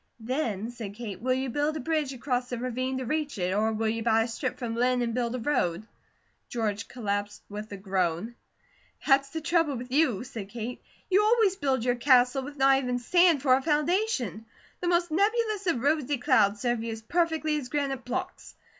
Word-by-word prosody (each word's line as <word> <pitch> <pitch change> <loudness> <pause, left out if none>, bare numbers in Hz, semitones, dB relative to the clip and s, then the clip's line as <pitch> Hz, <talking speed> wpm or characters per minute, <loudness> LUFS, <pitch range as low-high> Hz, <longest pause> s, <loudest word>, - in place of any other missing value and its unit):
"Then," 230 -3 -2
said 220 -4 -7
Kate, 215 -4 -7
"will 255 +1 +1
you 260 -1 -2
build 295 +4 0
a - - -4
bridge 305 -1 -1
across 250 -1 -2
the 245 - -3
ravine 255 +2 -2
to 260 - -3
reach 300 +1 -2
it, 180 0 0
or 215 +2 +2
will 220 0 -1
you 225 +1 -1
buy 225 0 +3
a - - -3
strip 250 +3 -3
from 235 -3 -4
Linn 250 +1 +2
and 230 -1 -2
build 240 0 -1
a - - -3
road?" 215 - 0 0.6
George 215 -3 -2
collapsed 205 -3 -3
with 210 +1 -7
a 200 - -5
groan. 190 +2 -1 0.7
"That's 275 -1 +4
the 320 +3 -5
trouble 330 -3 +1
with 250 +1 -7
you," 265 -7 +2
said 220 -6 -7
Kate. 235 +2 -6 0.3
"You 395 +3 +5
always 430 -3 +3
build 265 -7 0
your 245 - +3
castle 250 +1 +4
with 285 +2 -8
not 270 0 +5
even 250 -2 -1
sand 335 +3 +3
for 260 -3 +5
a 260 - +3
foundation. 300 - 0 0.3
The 355 - -3
most 345 -1 +2
nebulous 420 +2 +1
of 330 -8 +2
rosy 290 0 +1
clouds 215 -6 +3
serve 240 -2 0
you 230 - -3
as 220 0 -7
perfectly 320 +1 0
as 250 -3 -8
granite 275 -2 -2
blocks. 250 +1 -5
255 Hz, 200 wpm, -28 LUFS, 225-295 Hz, 0.7 s, You